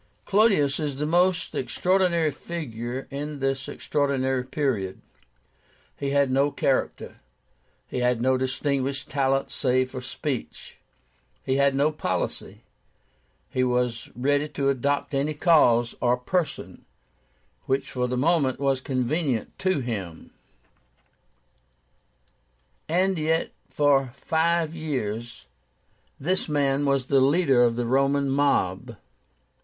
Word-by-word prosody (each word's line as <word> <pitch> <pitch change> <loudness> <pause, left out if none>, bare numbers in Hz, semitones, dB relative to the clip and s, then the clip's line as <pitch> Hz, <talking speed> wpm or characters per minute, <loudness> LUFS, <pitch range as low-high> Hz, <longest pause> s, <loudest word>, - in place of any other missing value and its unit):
"Clodius 195 -10 +3
is 150 -3 -2
the 145 +2 -2
most 175 +2 +2
extraordinary 180 -4 +1
figure 130 -5 -6
in 145 +2 -5
this 135 -1 -2
extraordinary 135 -3 -1
period. 130 -8 -2 1.0
He 140 - -3
had 140 -1 +2
no 135 +2 +3
character. 135 -2 -1 0.7
He - - -4
had 125 -1 +1
no 130 +2 +2
distinguished 135 +1 -2
talent 135 -1 +1
save 130 -1 +1
for 130 - -6
speech; 130 0 -5 0.6
he 130 0 0
had 140 -1 +3
no 145 +3 +2
policy; 155 - -4 0.9
he 130 - +1
was 125 -1 -1
ready 145 +4 +1
to 140 -2 -1
adopt 140 +3 -1
any 145 +3 0
cause 120 -8 +4
or 125 0 +3
person 165 +7 -3 0.8
which 135 +1 -1
for 125 -1 -1
the 125 0 -2
moment 140 -2 +2
was 135 -2 +1
convenient 130 -1 -1
to 185 -6 +1
him; 95 -10 -6 2.6
and 185 +2 +1
yet 160 +1 0 0.2
for 140 -3 +2
five 165 +2 0
years 120 -8 -4 0.7
this 180 +3 -1
man 145 -1 +1
was 140 -2 +1
the 135 0 +3
leader 140 -2 +4
of 120 -1 +3
the 120 0 -1
Roman 135 +2 +2
mob. 125 -5 0
140 Hz, 115 wpm, -25 LUFS, 125-150 Hz, 2.6 s, cause